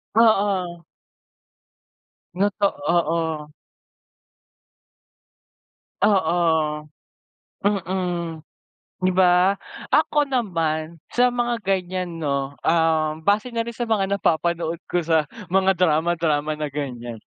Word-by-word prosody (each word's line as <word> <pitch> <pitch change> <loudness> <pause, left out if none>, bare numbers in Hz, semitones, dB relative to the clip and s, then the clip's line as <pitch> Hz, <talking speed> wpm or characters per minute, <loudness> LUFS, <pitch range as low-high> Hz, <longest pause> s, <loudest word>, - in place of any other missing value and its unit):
Oo. 195 -6 +2 1.5
Noto 200 +2 +1 0.3
oo. 160 -2 0 2.5
Oo, 160 -6 +2 0.8
mm, 180 -4 -1 0.6
di 185 0 +2
ba? 185 +1 +4 0.3
Ako 295 -1 +2
naman 165 - -1 0.2
sa 245 0 +4
mga 240 0 0
ganyan, 185 -2 -2
no? 140 -3 -1 0.2
Um, 160 -1 +2
base 205 +6 +2
na 230 - +1
rin 235 - -6
sa 235 +1 -4
mga 200 -3 +1
napapanood 170 -1 0 0.2
ko 175 - +2
sa 160 -2 +2 0.2
mga 190 0 +2
drama-drama 155 -3 +1
na 150 - -1
ganyan 125 -5 -5
175 Hz, 90 wpm, -23 LUFS, 160-195 Hz, 2.5 s, ba